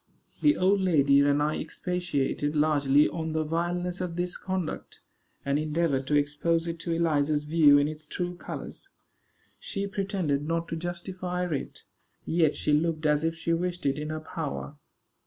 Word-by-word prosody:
The 300 0 +4
old 195 +2 +3
lady 145 -6 +4
and 145 +1 +3
I 150 +1 0
expatiated 150 -4 -2
largely 150 -1 +4
on 160 -1 -4
the 160 0 +1
vileness 175 +3 -2
of 175 -2 -3
this 175 0 -2
conduct, 185 -3 -4 0.5
and 140 +1 +1
endeavored 155 -3 0
to 150 - +2
expose 150 +3 +1
it 165 0 -4
to 170 - -4
Eliza's 155 -3 +1
view 150 -2 +6
in 145 0 +3
its 155 0 -7
true 180 +3 -3
colors. - - -8 0.7
She 200 -1 -3
pretended 195 -7 -1
not 165 0 -1
to - - -2
justify 180 +1 -3
it; 145 -6 -4 0.4
yet 160 -2 +2
she 150 - 0
looked 155 +1 +1
as 150 0 +3
if 165 0 0
she 165 +1 -1
wished 175 +1 -2
it 140 +1 +1
in 150 0 -4
her 155 0 -3
power. 155 -2 -5
160 Hz, 165 wpm, -28 LUFS, 150-175 Hz, 0.7 s, view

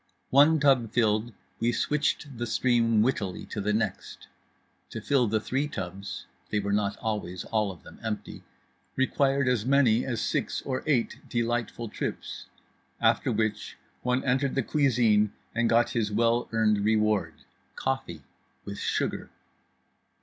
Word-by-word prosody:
One 150 +4 +6
tub 135 -6 +3
filled, 110 0 +1 0.3
we 115 +1 +2
switched 145 -1 -1
the 120 - -2
stream 115 -3 +3
wittily 105 -7 -1
to 105 - -3
the 105 +1 0
next. 105 -2 -3 0.6
To - - -5
fill 135 -4 +2
the 110 +1 +1
three 135 +6 -1
tubs 95 -5 -6 0.2
(they 105 - 0
were 100 0 -1
not 100 -1 0
always 100 -5 -3
all 105 -3 0
of 90 - -14
them - - -14
empty) 110 -2 -5 0.5
required 135 +1 +2
as 125 -4 +2
many 125 -3 +4
as 120 -4 -2
six - - -1
or 130 -1 -2
eight 130 -6 +1
delightful 120 0 -1
trips. 105 - -5 0.5
After - - +2
which 110 -1 -2 0.2
one 125 +1 0
entered 135 +1 +1
the 135 - +1
cuisine 115 -7 +3 0.2
and 115 0 +1
got 115 +1 +3
his 110 -3 -1
well 115 +3 +2
earned 110 -2 +2
reward—coffee 85 - -2 0.4
with 100 0 -6
sugar. - - -2
115 Hz, 140 wpm, -27 LUFS, 105-130 Hz, 0.6 s, One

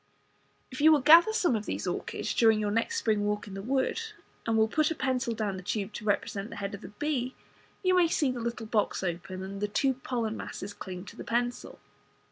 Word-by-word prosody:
If 255 - -5
you 315 +1 +8
will 300 -3 +5
gather 330 +9 +8
some 360 - +2
of 210 -1 -3
these - - -3
orchids - - -3
during 225 -2 +4
your 210 -1 0
next 230 - 0
spring 215 - +1
walk 210 0 -1
in 200 - -8
the 195 - -5
woods, 275 - -1 0.3
and 225 -1 +2
will 220 0 +4
put 305 +6 +2
a 325 - -2
pencil 260 -3 -1
down 210 -3 -2
the - - -7
tube 200 +2 -3
to 210 - -7
represent 205 0 -1
the - - -8
head 200 0 -4
of 200 - -7
the - - -8
bee 260 +2 -2 0.5
you 370 0 +4
may 355 -2 +5
see 295 -4 +1
the 250 - -5
little 235 0 -3
box 215 -3 0
open, 185 +1 -4
and 195 +1 -6
the 210 - +1
two 265 +6 +1
pollen 240 -3 -3
masses 200 -2 -6
cling 180 -1 -7
to - - -11
the - - -7
pencil. 240 +1 -2
225 Hz, 230 wpm, -29 LUFS, 205-265 Hz, 0.5 s, you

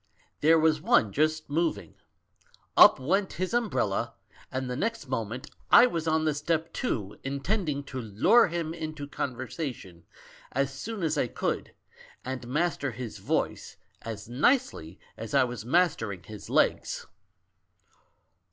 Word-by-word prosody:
There 160 +2 +5
was 155 -1 +3
one 110 -8 +3
just 155 +1 +1
moving. 165 +3 -1 0.8
Up - - +8
went 190 +9 0
his 185 +5 -3
umbrella; 215 - 0 0.4
and 130 0 -3
the 125 - -3
next 225 - -2
moment 120 -1 -4 0.2
I 240 - +9
was 165 -9 -2
on 160 0 +2
the 155 - +2
step, 160 +2 -1
too, 105 - -3
in 140 +1 -3
tending 160 -7 -1
to 130 -2 -6
lure 120 - +4
him 165 -1 -3
into 155 -3 -5
conversation 125 - -5 0.5
as 135 +1 0
soon 200 +8 -5
as 155 -2 +1
I - - +1
could, - - -3 0.5
and 130 -1 -5
master 150 +1 0
his 120 0 -7
voice - - -2 0.2
as 110 -2 -7
nicely 125 - +1 0.2
as 115 +3 -5
I 135 - +6
was 120 -3 -5
mastering 120 - +1
his 105 -2 -10
legs. - - +1
145 Hz, 140 wpm, -28 LUFS, 125-165 Hz, 0.8 s, I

